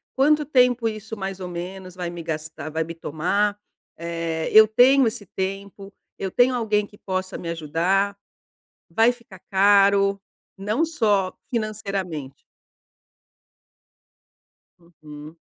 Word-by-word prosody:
"Quanto 300 +3 +3
tempo 250 -4 +3
isso 215 +1 -7
mais 195 -2 -5
ou 185 - -5
menos 180 +1 -7
vai 180 -2 -4
me 170 -1 -7
gastar 155 -1 -5
vai 160 +1 -1
me 165 - -7
tomar?"; 195 +7 -1 0.4
eh, 165 -1 -3
"Eu 220 0 +8
tenho 250 +4 +5
esse 220 -2 -4
tempo?"; 195 +1 -6 0.2
"Eu 190 - -4
tenho 245 +4 +3
alguém 210 -3 +1
que 205 - -19
possa 185 -1 -4
me 170 - -6
ajudar?"; 170 +5 0 0.7
"Vai 225 +8 +4
ficar 235 -6 -15
caro? 200 0 +4 0.4
Não 215 +11 0
só 205 - +1 0.2
financeiramente" 200 - -4 2.4
Uhum. 155 -2 -13
195 Hz, 120 wpm, -23 LUFS, 170-215 Hz, 2.4 s, Eu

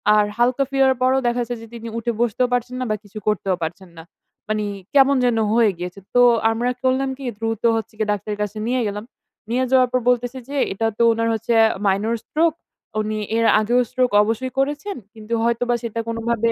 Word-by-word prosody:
আর 210 -1 +4
হালকা 245 +3 +2
ফিরার 270 -1 +3
পরও 260 +1 +3
দেখা 240 +1 0
যাচ্ছে 240 +1 -4
যে 230 - -10
তিনি 230 0 -8
উঠে 230 +1 -1
বসতেও 240 +2 +1
পারছেন 245 +1 -1
না, - - -1
বা 215 - +1
কিছু 205 +1 -13
করতেও 195 -3 +1
পারছেন 175 +3 -6
না। 165 - -9 0.5
মানে 215 -1 0 0.3
কেমন 275 0 +5
যেন 240 -2 +2 0.2
হয়ে 225 -2 +4
গিয়েছে। 180 +2 -6 0.2
তো 245 - +6 0.3
আমরা 235 +2 -1
করলাম 260 +1 +1
কি, 275 - -10
দ্রুত 225 0 -3
হচ্ছে 225 0 -4
গিয়ে 215 -1 -1
ডাক্তারের 205 +1 -4
কাছে 210 +1 -6
নিয়ে 250 +1 +1
গেলাম। 205 +1 -4 0.5
নিয়ে 250 +2 +1
যাওয়ার 255 -1 +4
পর 255 - +2
বলতেছে 245 +1 0
যে, 285 - -5 0.2
"এটা 225 +3 0
তো - - -1
উনার 230 0 0
হচ্ছে 225 +1 -1
আ - - +5 0.2
মাইনর 205 +4 +1
স্ট্রোক, 325 +2 +2 0.5
উনি 215 0 -3 0.2
এর 230 - +2
আগেও 235 +4 +2
স্ট্রোক 255 -1 +1
অবশ্যই 225 +4 -2
করেছেন। 295 +8 -1 0.2
কিন্তু 220 0 -7
হয়তোবা 235 +1 +1
সেটা 230 -1 -4
কোনোভাবে 230 0 0
235 Hz, 200 wpm, -21 LUFS, 215-255 Hz, 0.5 s, তো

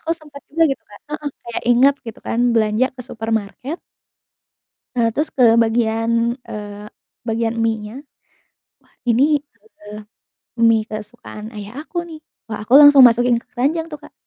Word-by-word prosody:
aku 325 - -5
sempet 295 -3 -13
juga 330 +3 +1
gitu - - -7
Kak 205 - -13
heeh, 300 -1 -3 0.2
kayak 235 -1 -5
inget 265 +4 +5
gitu 225 - -8
kan 230 - -2 0.2
belanja 215 +3 +2
ke 250 - -7
supermarket 225 - -4 1.2
eee, 230 -1 +3
terus 300 +2 0
ke 255 - +3 0.2
bagian, 230 +1 0
eee, 205 -1 -7 0.4
bagian 225 +1 -1
mienya. 220 -1 -2 0.9
Wah - - -32 0.2
ini, 235 +3 +3 0.6
eee, 210 0 -9 0.7
mie 220 -1 +3
kesukaan 215 0 -8
ayah 205 +2 -8
aku 350 - -9
nih. 315 -2 -10 0.3
Wah 220 -2 -5
aku 240 - -2
langsung 290 -2 +9
masukin 240 +1 +2
ke - - -29
keranjang 310 +6 0
tuh 300 - -7
Kak. - - -14
230 Hz, 150 wpm, -19 LUFS, 220-275 Hz, 1.2 s, langsung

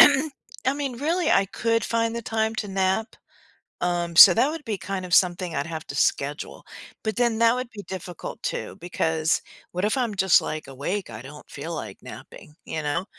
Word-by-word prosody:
I 270 -2 +3
mean, 280 -4 -3
really, 335 +5 +1
I 195 - +4
could 230 +3 0
find 230 0 0
the 235 - -4
time 220 0 -1
to 210 - -3
nap, 190 +3 +1 0.7
um, 175 -1 -1
so 180 - +12
that 270 - +3
would 320 -1 -6
be 215 -5 -3
kind 190 0 -4
of 180 0 0
something 180 -1 +3
I'd 140 +3 -1
have 160 -2 -6
to 140 - -6
schedule, 145 0 -1 0.4
but 220 +1 -1
then 235 -2 +2
that 230 +1 +5
would 250 -1 -3
be 205 -2 -9
difficult 180 -2 -7
too, - - -3
because, 160 -2 0 0.3
what 180 +3 -1
if 215 +6 +1
I'm 235 -4 0
just 190 -2 +5
like 155 0 -5
awake, 145 - -4
I 105 0 -8
don't 150 +3 -12
feel - - -6
like - - -6
napping, 150 - -11
you 155 - -4
know? 150 +5 -1
190 Hz, 195 wpm, -25 LUFS, 170-230 Hz, 0.7 s, so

